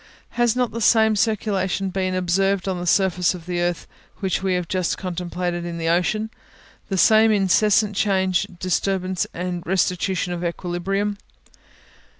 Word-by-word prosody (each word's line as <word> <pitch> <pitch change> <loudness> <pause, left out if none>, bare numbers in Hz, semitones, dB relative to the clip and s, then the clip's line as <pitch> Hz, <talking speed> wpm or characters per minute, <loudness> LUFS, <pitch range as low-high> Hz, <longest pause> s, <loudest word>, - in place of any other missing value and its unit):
Has 240 -1 +1
not 250 -2 0
the 230 - -5
same 220 0 +4
circulation 195 -3 0
been 185 0 -1
observed 190 +2 +1
on 185 -2 -2
the 175 - -5
surface 180 -1 +2
of 170 -2 -11
the 175 -1 -2
earth 175 -2 -1 0.3
which 190 -2 -1
we 190 -1 0
have 180 -1 -2
just 185 -1 -1
contemplated 175 -1 -3
in 170 -1 -5
the 165 0 -1
ocean, 215 +6 0 0.6
the 195 - -1
same 220 +3 +5
incessant 210 +1 +3
change, 190 -3 +1
disturbance 185 0 -1
and 180 0 -4
restitution 180 0 0
of 175 0 -5
equilibrium? 185 +4 -2
185 Hz, 150 wpm, -22 LUFS, 175-200 Hz, 0.6 s, same